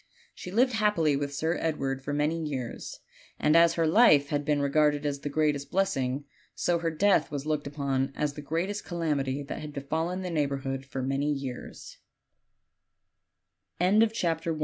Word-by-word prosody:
She - - -9
lived 245 +6 +2
happily 210 -9 +2
with 140 0 -2
Sir 160 +4 -1
Edward 135 -4 -2
for 145 - -4
many 150 +3 0
years; 130 -6 -5 0.4
and 150 +1 +2
as 170 0 +6
her 165 - +2
life 155 -6 +5
had 145 0 0
been 145 0 +1
regarded 145 +1 +2
as 140 -1 -1
the 145 - -4
greatest 145 -1 0
blessing, 135 -8 0 0.3
so 175 -1 +1
her 165 0 0
death 175 0 +2
was 145 -1 -4
looked 155 -2 -1
upon 140 -2 -1
as 150 -1 -1
the 150 - -7
greatest 175 +8 -2
calamity 145 -5 -1
that 140 - -6
had 150 -1 -7
befallen 160 +6 -2
the 180 - -4
neighborhood 135 -3 -2
f 130 - -3
150 Hz, 150 wpm, -28 LUFS, 140-165 Hz, 0.4 s, as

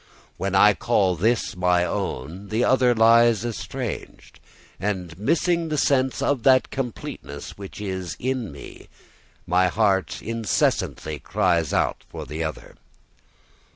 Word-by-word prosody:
When 100 0 -2
I 105 +2 +7
call 100 -5 +1
this 110 +6 0
my 90 -1 +2
own, 85 +7 -4
the 110 +3 +1
other 125 -2 +3
lies 115 0 +5
estranged; 115 -4 -6 0.4
and 90 -3 -3
missing 165 - +1
the 155 - -1
sense 130 -2 +1
of 140 -4 +1
that 130 +1 +4
completeness 115 - -6
which 100 0 -9
is 95 -5 -4
in 130 -4 -2
me, 70 - -12 0.6
my 90 +1 +3
heart 95 -3 +1
incessantly 110 -8 -1
cries 80 +3 +1
out - - 0
for - - -7
the 80 +2 -4
other. 80 -2 -6
105 Hz, 125 wpm, -24 LUFS, 90-120 Hz, 0.6 s, I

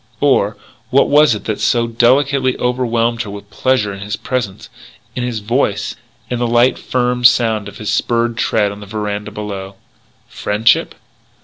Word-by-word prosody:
Or - - +2 0.3
what 135 +2 +3
was 150 -4 +5
it 105 - -7
that 110 -2 -2
so 120 -1 +2
delicately 130 +3 +2
overwhelmed 120 -2 0
her 110 - -5
with 100 +1 -10
pleasure 125 -6 0
in 95 - -8
his 100 +1 -4
presence, 120 -7 -4 0.5
in - - -2
his 120 -3 -3
voice, 110 -1 -1 0.3
in 125 - -3
the 120 - 0
light, 120 +2 +3
firm 125 -1 -1
sound 115 -4 +4
of - - -10
his 105 - -3
spurred 120 0 0
tread 105 -2 +1
on 100 - -9
the 100 - -10
veranda 105 0 -4
below? 100 -2 -6 0.5
Friendship? 105 +2 +1
115 Hz, 165 wpm, -17 LUFS, 105-125 Hz, 0.5 s, was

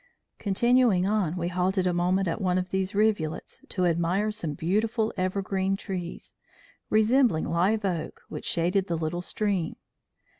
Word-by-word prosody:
Continuing 225 -1 +3
on, 195 -5 +1
we 170 -1 -1
halted 185 +1 0
a 180 - +2
moment 180 +2 +1
at 170 - -2
one 185 -1 +1
of 185 0 -2
these 190 +1 -1
rivulets, 205 -7 0
to 185 -2 0
admire 175 +5 +1
some 170 -9 -3
beautiful 215 +7 0
evergreen 190 +1 -1
trees, 180 -4 -6 0.6
resembling 220 -4 +3
live 200 +5 +1
oak, 170 -4 -3
which - - -7
shaded 180 +3 +1
the 170 - -1
little 165 +2 -2
stream. 190 -3 -1
190 Hz, 145 wpm, -27 LUFS, 175-210 Hz, 0.6 s, Continuing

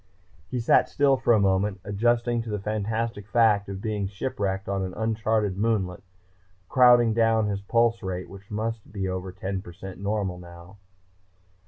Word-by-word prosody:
He 125 - -2
sat 115 - +3
still 140 -1 +3
for 130 -2 +1
a 110 - +5
moment, 95 0 +1
adjusting 120 +3 +1
to 115 - -7
the 105 - -1
fantastic 110 +1 -3
fact 105 -3 +3
of 100 +1 -6
being 105 -3 -1
shipwrecked 100 -2 -3
on 100 0 -1
an 95 -1 -4
unchartered 110 -3 0
moonlet, 100 -5 0 0.7
crowding 120 -3 +6
down 115 -1 +3
his 100 -1 -2
pulse 115 +2 +2
rate 95 -2 -4
which 100 +1 -13
might 110 +2 -2
be 100 -2 -3
over 95 0 -4
ten 95 +1 -4
percent 95 +1 -10
normal 100 -3 -2
now. 85 +2 -13
105 Hz, 160 wpm, -26 LUFS, 95-115 Hz, 0.7 s, crowding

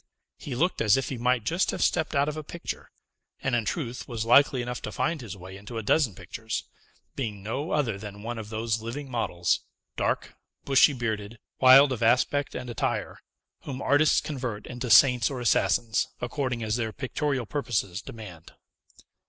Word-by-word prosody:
He 135 - -5
looked 175 +8 0
as 105 +2 +5
if 135 - -2
he 130 - -5
might 125 -1 +1
just 170 - +1
have - - -1
stepped 160 -3 +1
out 140 +1 +3
of 150 - -2
a 155 - -4
picture, 170 +3 -7 0.5
and, 130 - 0
in 115 -2 +1
truth, 125 -6 -3
was 115 -2 -3
likely 125 +1 +5
enough 125 0 -5
to - - -5
find 140 +4 -1
his 105 -5 -8
way 95 +1 -10
into 105 +4 -8
a 110 - -3
dozen 115 - +2
pictures; 110 +5 -5 0.5
being 105 -7 -4
no 130 - -3
other 115 -9 0
than 105 0 -9
one 120 0 -4
of 105 -1 -7
those 110 0 -1
living 130 +4 -6
models, 90 -7 0 0.4
dark, - - -1 0.3
bushy 140 +1 +5
bearded, 110 -3 -3 0.2
wild 135 +2 +8
of 125 - -3
aspect 130 +5 +2
and 125 - -5
attire, 120 - -2 0.5
whom 130 -2 -5
artists 145 +2 +3
convert 125 -8 -5
into 125 0 -5
saints 125 -1 +6
or 135 -3 -5
assassins, 115 -1 +2
according 120 -1 -2
as 110 +1 0
their 115 -2 -2
pictorial 135 0 -2
purposes 110 -7 -2
demand. 95 -9 -11
120 Hz, 175 wpm, -27 LUFS, 110-135 Hz, 0.5 s, wild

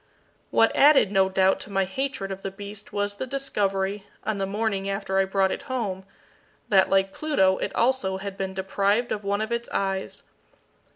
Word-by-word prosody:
What 225 - +3
added, 280 -8 +6
no 190 -1 +3
doubt, 190 0 +3
to 205 - -8
my 195 -1 +1
hatred 195 -1 -3
of 195 0 -6
the 195 - -3
beast 200 +1 -10
was 205 0 -1
the 260 - -4
discovery, 205 -7 -1 0.2
on 215 -1 -2
the 195 - -1
morning 200 -1 -1
after 195 -1 -1
I 195 - +3
brought 190 0 +1
it - - -3
home, 200 -7 -3 0.6
that, 190 -2 +5
like 195 0 +2
Pluto, 190 -12 +2
it - - -3
also 230 -6 +1
had 195 0 -6
been 190 -1 -4
deprived 200 +4 0
of 205 - -2
one 200 +1 0
of 220 +1 -3
its 235 0 -2
eyes. 195 -1 -2
195 Hz, 185 wpm, -25 LUFS, 190-220 Hz, 0.6 s, added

